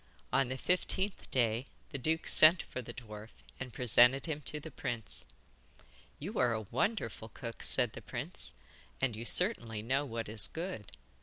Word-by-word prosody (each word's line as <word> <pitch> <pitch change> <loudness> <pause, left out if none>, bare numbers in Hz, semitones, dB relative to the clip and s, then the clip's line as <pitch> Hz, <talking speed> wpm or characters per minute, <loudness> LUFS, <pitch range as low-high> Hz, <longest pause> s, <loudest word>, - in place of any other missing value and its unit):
On 135 -1 +2
the 130 - -4
fifteenth 185 +5 -1
day 120 0 +1 0.2
the 140 - -5
duke 160 +5 -1
sent 165 +3 +8
for 130 - -7
the 120 - -9
dwarf 110 -2 -10 0.3
and 130 -1 -6
presented 125 +3 +4
him 155 -3 -4
to 150 - -3
the 160 +2 -10
prince. 120 - -4 0.9
'You 190 +10 -5
are 120 - +3
a 110 - -2
wonderful 115 - -2
cook,' 115 0 -8
said - - +1
the - - -9
prince, - - -4 0.5
'and 130 -4 0
you 115 +2 -7
certainly 120 - +2
know 135 +5 0
what 115 -4 -5
is 105 -2 +3
good. 165 - -7
125 Hz, 165 wpm, -32 LUFS, 115-155 Hz, 0.9 s, sent